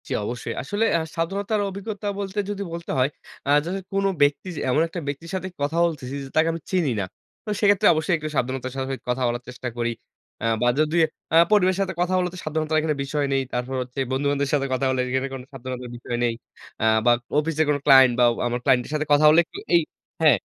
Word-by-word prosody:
জ্বী - - -3
অবশ্যই। 120 +2 -4
আসলে 205 +10 0
আ - - 0 0.2
সাবধানতার 200 +5 -1
অভিজ্ঞতা 200 +2 -6
বলতে 200 +1 -3
যদি 200 -1 -3
বলতে 170 0 -5
হয়, 130 +2 +3 0.4
আ - - -1 0.2
ধরেন 190 +3 -3
কোন 195 0 +1 0.2
ব্যক্তি 145 +5 +2 0.2
এমন 145 +5 +3
একটা 170 +2 -6
ব্যক্তির 145 +4 -5
সাথে 185 0 -3
কথা 145 +4 -1
বলতেছি 145 -6 -4
যে, - - -8
তাকে 160 +1 +4
আমি 165 - -6
চিনি 175 -8 +1
না। 100 - -1 0.4
তো - - -6
সেক্ষেত্রে 205 -2 +4
অবশ্যই 160 +2 +1 0.2
সাবধানতার 130 0 -2
সাথে 135 0 -2
কথা 125 +1 -1
বলার 120 +1 -2
চেষ্টা 125 0 -6
করি। 120 0 0 0.5
আ - - 0 0.2
বা 120 - +3
যদি 155 +1 +1 0.4
আ - - +5 0.2
পরিবারের 185 -3 +4
সাথে 190 -1 -1
কথা 180 +1 +1
হলে 180 -1 +1
তো - - -8
সাবধানতার 155 -1 0
বিষয় 145 +1 -1
নেই। 135 - +2
তারপর 125 +2 -2
হচ্ছে 125 +2 -6
বন্ধু-বান্ধুদের 140 +1 0
সাথে 140 -2 +2
কথা 130 +1 0
হলে 130 -1 +1
এখানে 130 +1 0
কোন 135 - -5
সাবধানতার 125 -1 -6
বিষয় 120 0 -4
নেই। 120 -1 +2 0.5
আ - - +2 0.2
বা 120 - +6 0.3
অফিসের 160 0 0
কোন 145 - +3
client 130 -3 +7
বা - - +6 0.2
আমার 120 0 -2
client 125 -1 +3
এর - - -10
সাথে 155 0 0
কথা 145 +1 +5
হলে 155 +2 +6
একটু - - -10 0.2
এই 170 - +6 0.4
হ্যাঁ। 150 -7 +6
150 Hz, 210 wpm, -24 LUFS, 130-175 Hz, 0.5 s, client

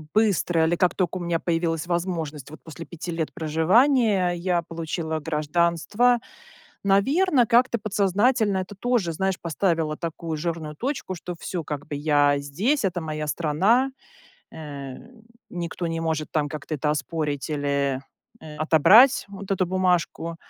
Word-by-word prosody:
быстро 190 -6 +2
или 170 +2 +1
как 180 +1 +1
только 185 -1 -1
у - - -5
меня 170 -1 0
появилась 165 -1 -1
возможность 170 -5 -3
вот 155 - -11
после 165 +1 -9
5 170 +1 -7
лет 165 -2 -3
проживания,- 190 - +3
я 175 0 0
получила 160 -1 -4
гражданство. 170 +10 +1 0.7
Наверное, 255 - +3
как-то 240 +1 +3
подсознательно 205 +1 +1
это 185 +2 -5
тоже, 225 -5 0
знаешь, 190 +3 -1
поставило 165 -2 0
такую 165 -1 -4
жирную 160 -1 -4
точку, 250 - -3
что 175 +1 -6
всё, 175 -1 -4
как 145 -1 -5
бы 145 - -4
я 145 -1 +3
здесь, 195 - -1
это 180 -2 0
моя 155 -1 -4
страна, 190 - +2 0.6
э, 140 -4 -7 0.6
никто 175 0 -4
не 165 0 -3
может 160 -2 -2
там 150 -2 0
как-то 155 +1 -6
это 150 +1 0
оспорить 150 -1 -2
или, 140 -2 0 0.4
э, 155 -1 -10
отобрать 190 - +6
вот 200 -1 -10
эту 190 -2 +1
бумажку, 180 -2 0
170 Hz, 145 wpm, -24 LUFS, 155-195 Hz, 0.7 s, отобрать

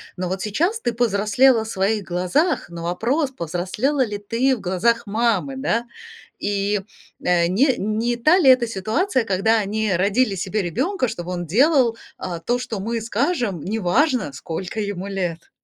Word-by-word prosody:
Но 180 -1 -3
вот 190 +1 -3
сейчас 335 - 0
ты 240 - -1
повзрослела 225 +2 +3
в - - -8
своих 205 +1 0
глазах, 185 - 0
но 170 -1 -7
вопрос, 245 - 0
повзрослела 210 - -1
ли 210 -2 -4
ты 230 +6 +1
в 225 - -10
глазах 195 +7 +1
мамы, 230 +4 0
да? 240 -3 0 0.5
И, 205 0 0 0.4
э, 175 -1 +2
не 250 - +3
не 220 +4 -1
та 310 +10 +4
ли 275 -7 +5
эта 255 -2 +6
ситуация, 230 - 0
когда 220 +3 +2
они 210 0 -1
родили 200 +4 +2
себе 195 +3 -2
ребенка: 255 - -1
"Чтобы 175 -2 -6
он 175 -1 -3
делал, 245 - +3 0.2
а, 175 -2 -5
то, 240 +8 -1
что 240 -4 -4
мы 230 +3 -2
скажем"- 230 - -1
неважно, 220 - +1
сколько 175 +8 -5
ему 200 -2 -3
лет. 180 -4 -4
215 Hz, 160 wpm, -22 LUFS, 190-250 Hz, 0.5 s, эта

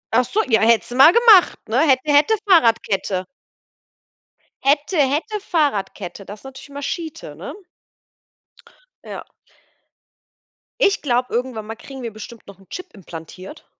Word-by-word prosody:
Ach 250 0 +4
so, 430 - 0
ja, 220 -3 +3
hättest 230 +1 +2
du - - -5
mal 275 +6 +8
gemacht, 450 -5 +6
ne? 235 +4 0
Hätte, 265 -5 +3
hätte, 295 +10 +4
Fahrradkette. 220 - +2 1.4
Hätte, 290 +6 +1
hätte, 305 - 0
Fahrradkette. 200 - -2
Das 205 +1 -10
ist - - -25
natürlich 270 +1 -11
immer 285 0 -8
schite, 320 +2 -6
ne? - - -8 1.5
Ja. - - -8 1.6
Ich 400 -4 +2
glaube, 250 -2 0
irgendwann 240 -3 -3
mal 225 - -6
kriegen 265 +3 -11
wir 230 - -5
bestimmt 215 +2 -11
noch 200 -2 -13
'n 195 - -21
Chip 365 -2 -9
implantiert. 185 - -11
255 Hz, 140 wpm, -20 LUFS, 215-310 Hz, 1.6 s, mal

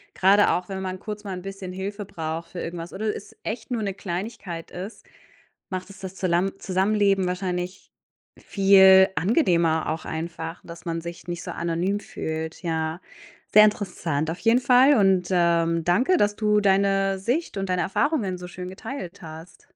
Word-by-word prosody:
Grade 200 +2 +5
auch, 180 0 -1
wenn 190 -1 -4
man 185 0 -4
kurz 210 0 -7
mal 195 - -5
'n 180 - -6
bisschen 195 -1 -7
Hilfe 200 +2 -5
braucht 165 -3 -5
für 180 - -6
irgendwas 170 0 -6
oder 210 +2 -2
es - - -10
echt 225 +3 -5
nur 230 -2 -1
'ne 195 -2 -2
Kleinigkeit 185 -2 -5
ist, 190 +5 -8 0.7
macht 185 0 -5
es 195 - -13
das 190 0 -7
Zulam 185 +1 0
Zusammenleben 195 0 +2
wahrscheinlich 180 0 -4 0.5
viel 190 -1 +6
angenehmer 170 - +2
auch 160 +1 -3
einfach, 165 +1 -5
dass 170 +1 -11
man 165 -1 -2
sich 170 -1 -9
nicht 175 0 -4
so - - -5
anonym 170 +4 -1
fühlt, 160 -4 -5
ja. 160 +1 -2 0.5
Sehr 215 0 +9
interessant 170 -7 -1
auf 175 - -6
jeden 235 +2 +4
Fall 255 +3 +6
und, 190 -4 +3
ähm, 170 -1 +2
danke, 240 - +3
dass 205 0 +2
du 210 -1 +2
deine 195 0 +2
Sicht 245 - -2
und 195 -1 -3
deine 180 -1 +1
Erfahrungen 205 - 0
so 180 - -8
schön 180 +1 -7
geteilt 190 -1 -7
hast. 160 +1 -11
185 Hz, 170 wpm, -24 LUFS, 170-200 Hz, 0.7 s, Sehr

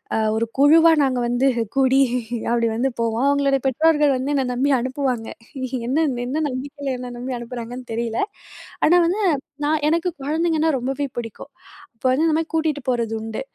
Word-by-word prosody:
அ - - +1 0.2
ஒரு 230 - +1
குழுவா 320 +4 +6
நாங்க 260 -2 +1
வந்து 245 +2 +1 0.3
கூடி 270 0 +4 0.5
அப்படி 235 -1 +2
வந்து 255 +4 +1
போவோம். 230 +2 0
அவங்களோட 280 -1 +2
பெற்றோர்கள் 295 +2 +3
வந்து 260 +2 -2
என்னைய 270 -3 +1
நம்பி 260 +3 +1
அனுப்புவாங்க. 255 -2 -2 0.6
என்ன 270 +5 0 0.3
என்ன 295 +5 -1
நம்பிக்கையில 275 +1 -4
என்னைய 245 -1 -7
நம்பிஅனுப்புறாங்கன்னு 245 0 -6
தெரியல. 230 0 -2 0.6
ஆனா, 350 +3 +5
வந்து 385 +5 0
நா - - +4 0.3
நான் 300 0 +1
எனக்கு 335 +3 +1
குழந்தைங்கன்னா 320 +2 +1
ரொம்பவே 270 +3 -2
பிடிக்கும். 230 -2 -7 0.4
அப்ப 225 - -14
வந்து 295 +5 +2
இந்த 310 - +2
மாதிரி 325 0 -3
கூட்டிட்டு 310 -2 0
போறது 235 -3 0
உண்டு. 220 0 -5
265 Hz, 160 wpm, -21 LUFS, 245-300 Hz, 0.6 s, குழுவா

